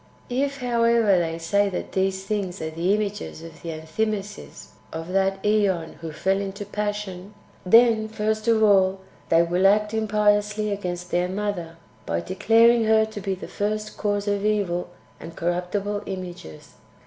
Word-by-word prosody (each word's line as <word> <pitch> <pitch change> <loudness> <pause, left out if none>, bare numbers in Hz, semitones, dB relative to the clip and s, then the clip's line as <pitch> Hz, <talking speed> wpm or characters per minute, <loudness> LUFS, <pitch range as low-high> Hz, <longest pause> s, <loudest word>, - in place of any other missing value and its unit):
4. 245 - -3
If, 280 0 -5
however, 230 -5 +3
they 165 -1 -2
say 200 +5 +1
that 185 - -5
these 190 0 0
things 195 -3 -2
are 160 0 -4
the 170 +5 +1
images 205 -5 -4
of 165 -1 -12
the 170 - -6
Enthymesis 200 +6 -4 0.2
of 165 +1 -6
that 195 +1 0
ZEon 200 -6 +1
who 165 -1 -7
fell 195 +5 0
into 200 +1 -5
passion, 205 -1 -4 0.3
then, 225 +1 +5
first 215 0 -2
of 225 -1 +4
all, 195 -2 +4 0.3
they 165 +1 +5
will 180 +3 +3
act 210 +2 +2
impiously 210 -1 +1
against 180 -3 -4
their 180 +1 +1
Mother, 185 -4 -3 0.3
by 85 0 0
declaring 225 - +4
her 220 0 +4
to 220 -1 -8
be 190 0 -2
the 185 - -9
first 215 +1 -3
cause 205 -1 -1
of 205 -1 0
evil 200 -5 0 0.3
and 165 - -10
corruptible 180 +4 -2
images. 175 - -8
200 Hz, 160 wpm, -24 LUFS, 180-210 Hz, 0.3 s, then